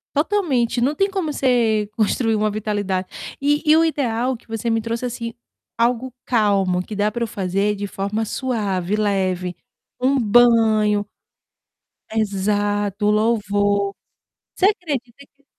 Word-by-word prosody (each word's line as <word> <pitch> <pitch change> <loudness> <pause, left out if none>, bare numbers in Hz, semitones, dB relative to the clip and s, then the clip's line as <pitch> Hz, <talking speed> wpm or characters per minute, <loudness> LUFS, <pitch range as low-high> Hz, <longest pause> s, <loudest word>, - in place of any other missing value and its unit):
Totalmente, 290 - +1
não 270 +5 +1
tem 390 +4 +1
como 360 -6 -2
você 230 -6 +1
construir 225 +1 +1
uma 215 0 +1
vitalidade. 205 -3 -2 0.3
E 290 +1 +2
e 310 - +8
o 325 - +5
ideal 255 -5 0
que - - -27
você 225 0 -3
me 225 0 +2
trouxe, 230 +2 -3
assim, 235 -1 -4 0.4
algo 240 +2 +1 0.2
calmo, 200 -6 +2
que 210 +3 -7
dá 205 +1 +1
para 235 - -5
eu - - -1
fazer 200 +1 -1
de 205 0 -4
forma 200 +2 -3
suave, 210 -6 -2
leve, 185 -4 -1 0.4
um 270 +2 +3
banho 220 -3 +4 1.1
Exato, 205 -1 0
o - - +4
louvor. 205 -2 +1 0.6
Você 380 - +3
acredita 280 - -2
que 280 - -34
220 Hz, 140 wpm, -21 LUFS, 205-245 Hz, 1.1 s, e